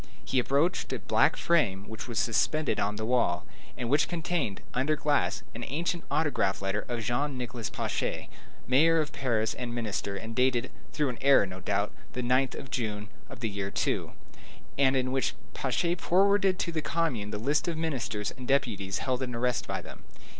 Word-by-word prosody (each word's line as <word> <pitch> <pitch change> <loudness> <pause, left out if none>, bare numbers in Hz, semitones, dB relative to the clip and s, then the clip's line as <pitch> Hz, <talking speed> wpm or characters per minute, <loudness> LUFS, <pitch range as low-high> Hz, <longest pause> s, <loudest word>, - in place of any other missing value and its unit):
He 130 - +2
approached 140 +8 +1
a - - 0
black - - +3
frame 105 - +2
which 110 +2 -7
was 120 -2 -4
suspended 130 +7 +1
on 105 +1 0
the 110 +1 -3
wall, 110 -8 +2 0.3
and 120 - -2
which 145 +5 +3
contained, 165 - -2
under 135 +5 +2
glass, 145 -1 +1
an 115 - -6
ancient 170 +6 -2
autograph 145 -11 +1
letter 95 +2 -2
of 120 -2 -2
Jean 130 +5 0
Nicolas 120 -2 -4
Pache, - - -2 0.4
mayor 160 +6 +5
of 155 -2 0
Paris 115 -4 0
and 120 -1 -5
minister, 100 -4 -2
and 110 +3 -6
dated, 130 -1 +2 0.2
through 150 -3 +1
an 120 - -5
error, 135 -5 +6
no 95 0 -7
doubt, 100 +2 0 0.2
the 125 - -2
9th 130 +2 +2
of 135 - -8
June, 105 -3 -2 0.2
of 130 -4 -10
the 115 - 0
year 100 -1 -3
II., - - -1 0.6
and 135 -1 +4
in 130 -1 +1
which 135 0 0 0.2
Pache 170 +6 0
forwarded 195 +2 +3
to 170 - -1
the 160 -1 -1
commune 150 -10 -1
the 105 - -3
list 140 +10 +1
of 170 -2 -1
ministers 120 -10 -2
and 125 -1 -9
deputies 105 -9 +1
held 130 -1 0
in 125 -2 -3
arrest 125 0 0
by - - -3
them. - - -11
125 Hz, 185 wpm, -29 LUFS, 110-150 Hz, 0.6 s, error